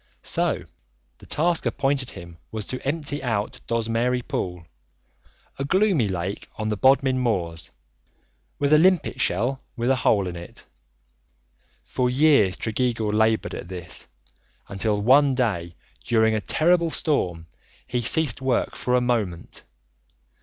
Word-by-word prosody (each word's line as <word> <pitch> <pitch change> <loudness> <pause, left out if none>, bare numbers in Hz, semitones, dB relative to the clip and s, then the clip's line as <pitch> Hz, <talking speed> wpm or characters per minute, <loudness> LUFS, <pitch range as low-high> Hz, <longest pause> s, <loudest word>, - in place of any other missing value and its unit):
So - - 0 0.6
the - - -15
task 170 +2 0
appointed 135 -2 0
him 85 -1 -10
was 110 -2 -5
to 130 - -6
empty 145 0 -2
out 110 -5 -2
Dozmary 115 +2 0
Pool, 90 -2 -4 0.9
a - - -1
gloomy 185 - +2
lake 95 +1 -4
on 110 0 -3
the 105 - 0
Bodmin 130 +2 +3
Moors, 90 -9 -2 0.9
with 140 +1 +2
a 155 - +7
limpet 185 0 +2
shell 120 +9 0
with 120 +1 0
a 135 - +2
hole 100 -5 +2
in 90 -1 -5
it. 85 0 -10 1.2
For 125 -1 0
years 130 -8 +4
Tregeagle 115 -2 -1
laboured 110 +1 +2
at - - -6
this, 90 -1 -6 0.6
until 105 +1 -1
one 135 +5 +5
day 85 -9 -1 0.3
during 110 -1 +2
a 110 - 0
terrible 170 +5 +2
storm 90 - -1 0.4
he 125 -1 -2
ceased 140 +1 +2
work 130 -2 0
for 125 - 0
a 125 - +3
moment. 105 -9 -2
120 Hz, 135 wpm, -24 LUFS, 100-135 Hz, 1.2 s, a